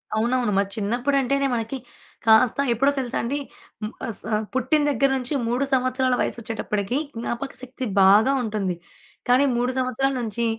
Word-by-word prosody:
అవునవును. 240 0 +1
మరి 200 0 +2
చిన్నప్పుడంటేనే 275 +5 +1
మనకి 230 +4 -3 0.5
కాస్త 225 +3 +5 0.2
ఎప్పుడో 275 +5 +2
తెలుసాండీ? 255 +2 -2 0.5
మ్ 215 - -5 0.2
అస 225 - -3 0.3
పుట్టిన 260 +4 +2
దగ్గర 275 0 +2
నుంచి 255 +3 -4
3 245 +4 0
సంవత్సరాల 255 0 +2
వయస్సోచ్చేటప్పటికి, 225 0 -2 0.2
జ్ఞాపకశక్తి 255 +2 -4 0.2
బాగా 210 +8 +6
ఉంటుంది. 205 -5 -2 0.5
కానీ 260 +3 +5
3 245 +1 +1
సంవత్సరాల 260 +2 0
నుంచి 235 +1 -2
245 Hz, 125 wpm, -23 LUFS, 225-265 Hz, 0.5 s, బాగా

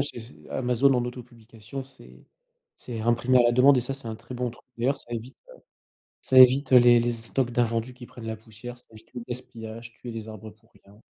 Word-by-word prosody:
c'est 140 -3 -3
c'est 115 +3 -15
Amazon 125 +2 +2
en 125 -1 +1
auto-publication, 120 0 -9
c'est 130 0 -17 0.5
c'est 115 -3 -7
imprimé 120 +3 +2
à - - +6
la 120 0 +3
demande 130 +3 +6
et - - +3
ça, 125 - -4
c'est 135 -3 -9
un 110 - -4
très 120 +3 -11
bon 125 0 -2
truc 120 - -18
d'ailleurs, 130 +4 +1
ça 120 - -12
évite, 120 +3 -6
heu, - - -13 0.7
ça 130 - +1
évite, 130 +3 +7
heu, - - +10
les 120 -1 +7
les 120 +1 0
stocks 120 +2 0
d'invendus 120 +1 -1
qui 125 -1 -11
prennent 120 -1 -11
la 110 - -3
poussière, 110 +2 -11
ça 125 - -19
évite 110 +1 -17
le 120 - -5
gaspillage, 115 -2 -8
tuer 120 +1 -9
les 110 -1 -7
arbres 110 0 -10
pour 115 +2 -27
rien. 100 +2 -19
120 Hz, 225 wpm, -26 LUFS, 115-125 Hz, 0.7 s, heu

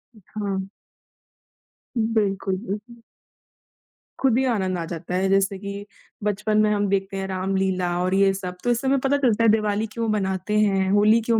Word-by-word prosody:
हाँ। 200 -2 -4 1.3
हुँ, 225 -2 +1
बिल्कुल, 195 -3 0
बिल्क 215 +4 -6 1.2
खुद 260 -3 +3
ही 265 - +2
आनंद 190 -5 -1
आ 170 - -3
जाता 170 +1 -5
है 190 +1 +1
जैसे 195 0 +2
कि, 200 0 -6 0.4
बचपन 210 +1 0
में 215 - +3
हम 205 -1 +1
देखते 195 0 -1
हैं 195 0 -3
रामलीला 190 -1 -1
और 185 +1 0
ये 195 0 +4
सब, 180 -2 -6
तो 245 - 0
इस 240 0 0
से 270 - -2
हमें 275 +1 +3
पता 270 +2 +1
चलता 235 -5 +2
है 225 - +5
दिवाली 215 0 +1
क्यों 230 -1 -2
मनाते 195 0 -1
हैं, 195 -2 +2
होली 210 +3 +5
क्यों 230 0 +1
200 Hz, 180 wpm, -23 LUFS, 190-220 Hz, 1.3 s, है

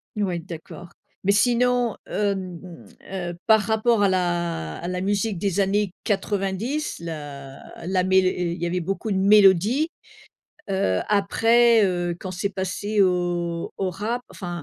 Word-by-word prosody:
Ouais, 190 -5 -1
d'accord, 170 0 -10 0.3
mais 195 - +3
sinon, 245 +2 +2
hem, 190 -4 -2
mmh, 180 -3 -12 0.3
heu, 175 -2 -4
par 220 -1 +6
rapport 220 +1 +1
à 200 - +4
la 175 - -1
à 170 - -6
la 180 0 -3
musique 205 +1 0
des 195 +1 -1
années 200 -1 +1
90, 205 +7 -2
la 145 -5 -8 0.3
la 185 0 +1
mél 190 0 +3
et 180 -1 0
il 170 - -8
y - - 0
avait 175 +1 -1
beaucoup 195 +5 -3
de 195 - +1
mélodies, 205 - +5 0.8
heu, 95 - +1
après, 225 +3 +4
heu, 175 -2 -1
quand 185 - -6
c'est 185 +2 -2
passé 200 +2 -1
au 175 -2 -1
au 190 -1 -1
rap, 220 +7 -3
enfin, 175 -3 -6
190 Hz, 150 wpm, -23 LUFS, 175-210 Hz, 0.8 s, par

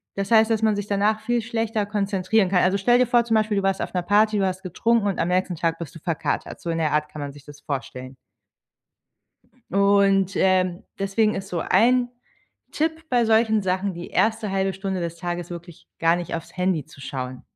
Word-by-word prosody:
Das 195 +1 -3
heißt, 220 0 +5
dass 225 -1 +1
man 220 -1 +2
sich 205 0 -3
danach 210 +2 +1
viel 240 0 0
schlechter 225 -2 -2
konzentrieren 200 -1 +1
kann. 180 -2 +3
Also 185 +2 +2
stell 240 +5 +3
dir 250 - +3
vor, 240 0 +3
zum 230 - -1
Beispiel, 215 -1 +1
du 195 - 0
warst 195 0 0
auf - - -4
'ner 180 - 0
Party, 210 +2 +3
du 195 - +2
hast 185 0 -2
getrunken 215 +4 +1
und 195 - -2
am 170 - 0
nächsten 180 -1 0
Tag 165 +1 -1
bist 170 -2 -8
du 165 - -9
verkatert. 165 -1 -3
So 170 - -5
in 165 - -1
der 155 -2 +1
Art 150 0 0
kann 150 - -8
man 140 -1 -5
sich 145 -1 -15
das 145 -1 -13
vorstellen. 130 -3 -6 1.5
Und, 200 -1 +3
ähm, 185 -1 +2 0.2
deswegen 210 +2 +1
ist 195 0 -5
so 175 -3 -2
ein 245 +5 +3 0.6
Tipp 320 +1 -1
bei 240 -2 +3
solchen 220 -1 +3
Sachen: 190 +1 -1
Die 170 +1 -7
erste 220 -2 +1
1/2 195 0 0
Stunde 190 0 -4
des 170 -1 -4
Tages 175 0 -4
wirklich 170 -1 -10
gar 165 +1 +3
nicht 175 - -5
aufs 165 +2 -7
Handy 180 -5 0
zu 155 -1 -16
schauen. 130 -2 -6
195 Hz, 215 wpm, -23 LUFS, 175-215 Hz, 1.5 s, heißt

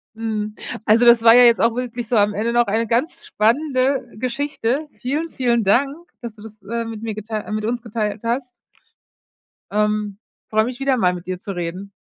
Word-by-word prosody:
Mhm. 215 -1 -3 0.3
Also, 225 +3 +4
das 235 -1 +7
war 225 0 +8
ja 245 - +8
jetzt 235 -1 +5
auch 230 0 +3
wirklich 245 -1 -4
so 240 - 0
am 205 -1 +3
Ende 225 +3 -1
noch 240 0 +3
eine 225 +3 0
ganz 240 +9 -1
spannende 260 +3 +1
Geschichte. 265 +3 -2
Vielen, 295 +8 -2
vielen 240 -5 0
Dank, 275 +8 +2 0.3
dass 235 -3 -7
du 210 - -16
das, 215 -1 -13
äh, 230 +3 -3
mit 225 -2 -7
mir 225 -1 -3
geteil 215 0 -5
äh, - - -6
mit 215 0 -2
uns 235 +2 -2
geteilt 215 -2 -3
hast. 245 +3 -1 1.2
Ähm. 210 -1 0 0.3
Freue 220 0 +3
mich 245 +2 -5
wieder 270 -1 +2
mal 180 -7 +2
mit 175 -1 -8
dir 185 -1 -4
zu 200 - -6
reden. 180 +2 -5
230 Hz, 200 wpm, -20 LUFS, 210-245 Hz, 1.2 s, war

